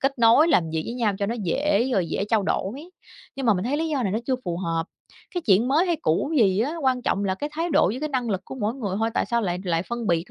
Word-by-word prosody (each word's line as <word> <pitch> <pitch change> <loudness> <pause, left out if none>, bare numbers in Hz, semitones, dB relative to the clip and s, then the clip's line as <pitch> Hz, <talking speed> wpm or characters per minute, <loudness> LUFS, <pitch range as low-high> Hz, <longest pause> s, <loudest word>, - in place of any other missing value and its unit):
kết 270 -1 0
nối, 235 +8 +6
làm 165 - +2
việc 160 0 -1
với 235 - -4
nhau 230 -5 +1
cho 200 - 0
nó 230 - -2
dễ, 245 - +1
rồi 185 -5 +1
dễ 200 - -1
trao 220 -3 +3
đổi. 195 +1 -1 0.6
Nhưng 270 -3 -3
mà 215 - +5
mình 185 +3 -2
thấy 275 +4 0
lý 325 +1 -1
do 280 -5 -1
này 195 -3 -1
nó 220 - +1
chưa 260 - +1
phù 170 -1 -2
hợp, 165 -2 -2 0.5
cái 355 - 0
chuyện 215 +5 +4
mới 320 +7 +3
hay 340 -2 +1
cũ 165 - +1
gì 200 -4 +3
á, 290 +8 -1
quan 255 -2 +1
trọng 200 - 0
là 190 -1 0
cái 290 +9 -5
thái 330 +2 -2
độ 300 +1 +4
với 245 +5 -3
cái 305 - -2
năng 250 -5 -2
lực 190 -1 -1
của - - -8
mỗi 220 -1 -2
người 200 -8 -3
thôi, 225 +1 0
tại - - 0
sao 235 0 +1
lại 180 -2 -1
lại 170 -1 0
phân 235 +1 -5
biệt 170 +1 0
230 Hz, 295 wpm, -24 LUFS, 190-270 Hz, 0.6 s, nối